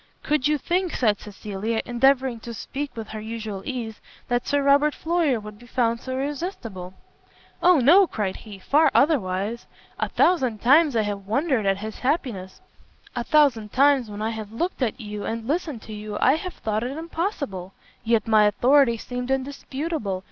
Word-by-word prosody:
"Could 295 -2 +1
you 300 0 +2
think," 355 +3 -1
said 215 -5 +2
Cecilia, 210 +2 -4
endeavouring 255 0 +2
to 235 +1 -8
speak 285 +5 -5
with 220 -1 -6
her 220 - -6
usual 220 -3 -5
ease, 235 -5 -5 0.3
"that 245 0 0
Sir 285 -1 +1
Robert 285 +2 +4
Floyer 320 -7 +1
would 210 0 -10
be 240 - -15
found 235 -1 0
so 260 +1 -6
irresistible?" 260 - -5 0.7
"Oh 360 -1 +6
no!" 350 +10 +6
cried 205 -9 -3
he, 210 -3 -11
"far 295 +10 +3
otherwise; 220 - +1 0.3
a - - -1
thousand 260 -11 +2
times 280 +4 +5
I 220 - +3
have 200 -1 -4
wondered 255 -2 +1
at 195 0 +2
his 215 +1 -7
happiness; 250 - -2 0.5
a - - -1
thousand 265 -9 +3
times, 275 -3 +4
when 210 +1 -5
I 220 - -1
have 215 -2 -7
looked 340 +8 -3
at 245 -1 -1
you, 210 -2 -6
and 225 0 -4
listened 300 -6 -2
to 220 - -9
you, 210 0 -6
I 260 - +5
have 365 +3 -5
thought 215 0 -2
it 260 +4 -4
impossible! 320 - -4 0.3
yet 225 -1 +1
my 215 -1 +5
authority 240 +4 +4
seemed 245 +2 -5
indisputable. 270 - -3
240 Hz, 175 wpm, -24 LUFS, 215-285 Hz, 0.7 s, Oh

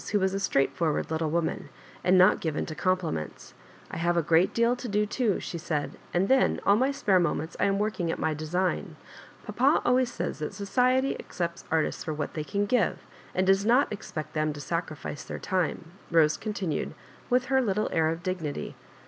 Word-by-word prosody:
who 205 - +4
was 190 0 +1
a 195 - -1
straightforward 160 -3 0
little 160 0 0
woman, 160 -2 -1 0.3
and 185 +1 +4
not 185 +3 +6
given 160 -3 -1
to 155 - -6
compliments. 170 - -2 0.2
" - - -21
I - - -5
have 170 +1 +1
a 170 - +3
great 165 +4 +3
deal 235 +1 +2
to 245 - -6
do 210 -1 +1
too," 220 -2 0
she 170 - -5
said, 150 -2 -2
•* - - -15 0.2
and 180 +2 +1
then 265 +3 +3
all 200 - +6
my 260 +5 +2
spare 205 -9 +2
moments 160 -1 -1
I - - +3
am 195 0 +2
working 205 -4 -1
at - - -3
my 160 - 0
design. 165 +5 -2 0.5
Papa - - +3
always 250 0 +3
says - - -4
that 150 - -4
society 255 +6 +2
accepts 170 -2 -4
artists 160 -1 0
for 155 -3 -3
what 150 -1 -4
they 155 - -3
can 200 +7 -1
give, 225 0 +1 0.4
and 185 - +2
does 195 +1 +4
not 245 +6 +4
ex 210 - -7
pect 155 -2 -5
them 155 -1 0
to 145 - -9
sacrifice 155 -1 -4
their - - -6
time," 175 -3 -2 0.2
Bose 160 -2 +4
con 215 -1 -4
tinued, 185 -6 -2 0.4
with 250 0 +3
her 265 - +5
little 215 -3 0
air 160 -1 +2
of 165 +1 -4
dignity. 180 -6 -3
180 Hz, 210 wpm, -27 LUFS, 160-210 Hz, 0.5 s, not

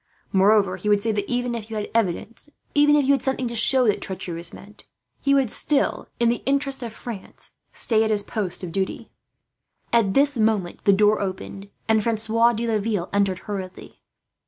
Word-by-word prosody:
Moreover 195 -1 +3
he 210 +3 -3
would 205 -1 +3
say 225 - +1
that, 205 -1 -3
even 245 0 -1
if 225 -2 -6
you 220 - -6
had 210 -1 -4
evidence, 230 +5 -2 0.2
even 295 0 +5
if 290 -2 +3
you 275 - +3
had 275 -3 +2
something 265 -2 -1
to 235 - -5
show 255 +3 +5
that 205 - +1
treachery 185 -2 -4
was 170 +1 -5
meant, 210 +1 -13 0.4
he 280 0 +3
would 265 -5 +2
still, 285 -2 0
in 235 - +3
the 235 +1 0
interest 275 -1 0
of 235 -2 -5
France, 220 -2 -9 0.2
stay 220 -2 +1
at 220 - 0
his 210 -2 +1
post 200 -4 -4
of 175 - -5
duty." 190 +1 -3 0.8
At 220 -5 +3
this 280 -2 +3
moment 215 -5 0
the 200 - +6
door 210 +2 +3
opened, 195 +1 -6 0.2
and 220 -1 +3
Francois 230 +1 +2
de 230 +1 -2
Laville 215 -4 -1
entered 200 -2 +1
hurriedly. 190 -3 -7
220 Hz, 195 wpm, -23 LUFS, 200-240 Hz, 0.8 s, the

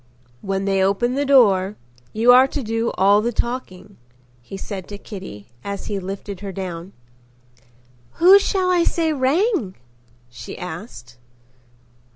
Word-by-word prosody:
"When 195 0 -2
they 195 -1 +1
open 200 +6 +1
the 280 +1 -1
door, 205 -8 +4 0.4
you 230 +3 +4
are 255 +2 +7
to 275 0 -5
do 225 +1 -1
all 200 +2 +4
the 235 +2 -1
talking," 235 -5 -5 0.4
he 195 +11 -9
said 195 -2 -7
to 205 - -8
Kitty 185 - -10
as 200 0 -5
he 205 -2 -3
lifted 195 +1 -7
her 200 0 -6
down. 185 -1 -7 1.2
"Who 375 +4 +7
shall 375 -2 0
I 350 -1 +3
say 325 -2 0
rang?" 290 - 0 0.5
she 120 -1 -10
asked. 160 - -9
205 Hz, 140 wpm, -21 LUFS, 190-260 Hz, 1.2 s, are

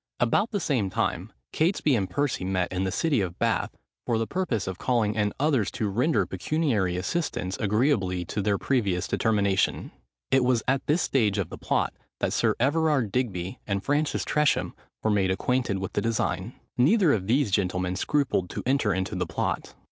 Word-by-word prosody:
About 120 - +2
the 205 - -1
same 125 - 0
time, - - -2 0.2
Catesby 155 -4 +2
and 95 -5 -1
Percy 140 -2 -1
met 95 -1 -1
in 95 +1 -1
the 95 - -1
city 150 - +1
of 90 -3 -4
Bath, - - 0 0.3
for 115 - +2
the 115 - 0
purpose 125 - -1
of 95 -1 -5
calling 115 -5 +1
in 105 -1 0
others 135 -8 +2
to 110 -4 -1
render 125 +11 +1
pecuniary 115 - 0
assistance 95 - -2
agreeably 100 -5 +1
to 105 - -3
their 100 0 +1
previous 100 -10 0
determination. 100 -3 +1 0.4
It 135 -1 +4
was 125 -2 +2
at 135 +1 0
this 160 +3 +2
stage 105 -7 +1
of 95 -5 -1
the - - -8
plot, - - 0 0.3
that - - 0
Sir - - +2
Everard 145 -4 +2
Digby 95 -8 -2
and 100 -1 -1
Francis 145 +2 0
Tresham 150 -1 +1 0.3
were 110 - +2
made 100 -2 +2
acquainted 120 +2 0
with 95 0 -5
the - - 0
design. 115 -1 -1 0.2
Neither 170 - +5
of 95 -3 -1
these 125 -1 +2
gentlemen 90 -2 0
scrupled 130 -6 0
to - - -5
enter 125 -7 +2
into 95 +2 -2
the 90 -2 -2
plot. 90 - -3
110 Hz, 180 wpm, -26 LUFS, 95-140 Hz, 0.4 s, Neither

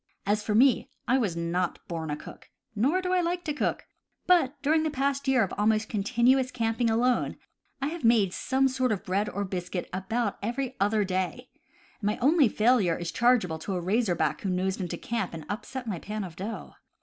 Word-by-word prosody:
As 205 +1 +1
for 210 0 -1
me, 255 +2 +4 0.2
I 260 +2 +3
was 200 -9 0
not 170 +1 -1
born 165 -2 -4
a 150 - -1
cook, 150 - -12 0.3
nor 285 - +2
do 365 0 0
I 365 - +3
like 350 +1 -1
to 300 - -2
cook; 295 - -1 0.4
but 305 -6 +3
during 310 +2 +3
the 315 - 0
past 280 -1 -1
year 260 -3 +4
of 190 - -3
almost 215 +1 +2
continuous 250 +5 +2
camping 230 -1 0
alone, 240 +3 +1 0.5
I 280 - +1
have 335 -2 -7
made 220 -5 +4
some 265 +1 +1
sort 255 -1 0
of 205 -1 -2
bread 200 +2 0
or 200 0 -3
biscuit 180 -1 -4
about 205 +4 -2
every 250 +4 -3
other 205 +2 +2
day, 190 +6 -2 0.5
and 205 - -2
my 210 - 0
only 280 0 +4
failure 215 -6 +3
is 170 -1 -4
chargeable 225 -10 +2
to 190 +4 -4
a - - -1
razorback 175 - 0
who 195 - -2
nosed 185 +1 -1
into 180 - -3
camp 225 -7 -3
and 160 -2 -8
upset 250 +5 -5
my 200 -7 -3
pan 210 +3 -4
of 175 -4 -8
dough. 205 +6 -6
220 Hz, 200 wpm, -27 LUFS, 190-260 Hz, 0.5 s, me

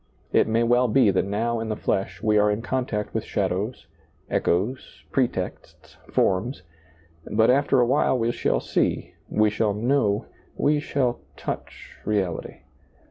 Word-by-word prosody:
It - - +4
may 115 +1 +2
well 120 +2 +3
be 115 -2 +4
that 95 - +1
now 115 +4 -1
in 115 0 -4
the 110 - -1
flesh 95 0 -2
we 110 -1 +3
are 105 0 +4
in 105 +2 -1
contact 125 -5 -2
with 110 - -1
shadows, 100 +4 -2 0.5
echoes, 105 +10 -1
pretexts, 120 -8 -3
forms, 95 +3 0 0.7
but 110 +2 +4
after 140 0 +3
awhile 130 +2 +3
we 115 0 +1
shall - - 0
see, - - -1 0.2
we 105 0 +3
shall 105 -1 0
know, 110 -2 +1 0.3
we 150 +1 +2
shall 130 -5 -1 0.2
touch - - -7
reality. 95 -5 -2
110 Hz, 140 wpm, -24 LUFS, 105-125 Hz, 0.7 s, It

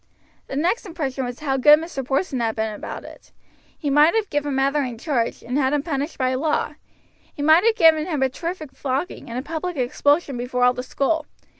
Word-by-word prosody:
The - - -6
next 355 - 0
impression 275 -7 -3
was 245 +3 -7
how 270 -3 0
good 295 +3 +7
Mr. 315 -4 -5
Porson 270 +1 -1
had 225 -2 -1
been 220 -1 -2
about 210 - -7
it. - - -14 0.5
He 290 - -2
might 300 +6 +5
have 440 -3 0
given 290 -1 -1
Mother 275 +2 +2
in 250 -4 -4
charge, 240 -3 -2
and 250 +4 -1
had 265 0 +1
him 290 -1 +1
punished 290 -1 -3
by 255 -1 +1
law. 300 +2 0 0.6
He 285 - -4
might 315 +4 +6
have 460 -1 +4
given 320 -2 +5
him 300 -6 0
a 265 - +2
terrific 330 +1 -6
flogging 270 +4 -4
and 235 - -5
a 255 - -3
public 330 +2 -4
expulsion 280 +3 +1
before 245 +1 -1
all 250 0 +5
the 250 - -4
school. 295 +4 -1
285 Hz, 210 wpm, -22 LUFS, 255-315 Hz, 0.6 s, good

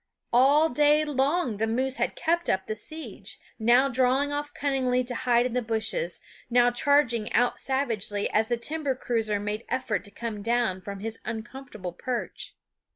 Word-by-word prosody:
All 285 +6 +5
day 295 +3 +4
long 280 - 0
the 225 +2 0
moose 260 +4 0
had - - -1
kept 340 +2 0
up 190 0 +1
the 215 - -3
siege, 315 +8 -7 0.2
now 240 +4 +5
drawing 265 +2 +2
off 290 0 -3
cunningly 260 -3 0
to 245 0 -5
hide 240 0 +2
in 250 - -2
the 250 - +1
bushes, 225 - -1 0.3
now 245 0 +4
charging 245 -4 +2
out 245 +2 +2
savagely 225 -7 -1
as 220 +1 +2
the 240 0 0
timber 290 +2 -2
cruiser 225 -4 -1
made 210 +2 -3
effort 255 -5 -1
to - - -8
come 220 -1 -5
down 230 -4 0
from 200 +1 -7
his 225 +1 -4
uncomfortable 220 -5 -6
perch. 245 +6 -5
245 Hz, 165 wpm, -27 LUFS, 220-275 Hz, 0.3 s, All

